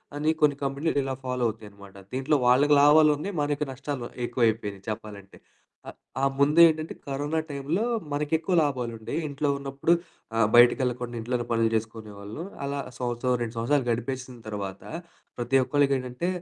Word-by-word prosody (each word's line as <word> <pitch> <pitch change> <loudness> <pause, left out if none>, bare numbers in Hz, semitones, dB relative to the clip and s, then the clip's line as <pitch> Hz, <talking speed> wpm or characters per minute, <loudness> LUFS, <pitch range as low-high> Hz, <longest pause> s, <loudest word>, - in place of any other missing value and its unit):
అని 150 +2 +1
కొన్ని 150 -2 +4
కంపెనీలు 140 +3 -1
ఇలా 135 -1 -3
ఫాలో 125 -1 -1
అవుతాయన్నమాట. 100 -3 -9 0.2
దీంట్లో 135 +3 +1
వాళ్ళకి 140 +4 +5
లాభాలున్నాయి. 150 +5 +4
మనకు 145 0 0
నష్టాలు 135 -1 -5 0.2
ఎక్కువవైపోయినాయి 110 -5 -1
చెప్పాలంటే. 105 -2 -8 0.5
ఆహ్ - - -12 0.3
ఆ - - +5
ముందేంటంటే 155 +2 +5
కరోనా 145 +3 -1
టైంలో 145 +8 -1 0.3
మనకి 150 +1 -2
ఎక్కువ 170 +3 -3
లాభాలుండేయి. 120 -3 -3
ఇంట్లో 145 +1 -2
ఉన్నప్పుడు 140 +4 0 0.4
ఆహ్, 115 -2 +4
బయటికెళ్ళకుండా 125 0 +4
ఇంట్లోనే 120 +1 -2
పనులు 115 -1 +2
చేసుకునేవాళ్ళు. 110 +2 -5 0.2
అలా 140 0 -2 0.2
సంవత్సరం, 125 0 -1
రెండు 115 -1 -3
సంవత్సరాలు 130 +4 +1
గడిపేసిన 125 +1 -4
తర్వాత 100 -2 -5 0.5
ప్రతి 120 +2 -1
ఒక్కళ్ళకేంటంటే 135 +1 0
130 Hz, 130 wpm, -26 LUFS, 115-145 Hz, 0.5 s, వాళ్ళకి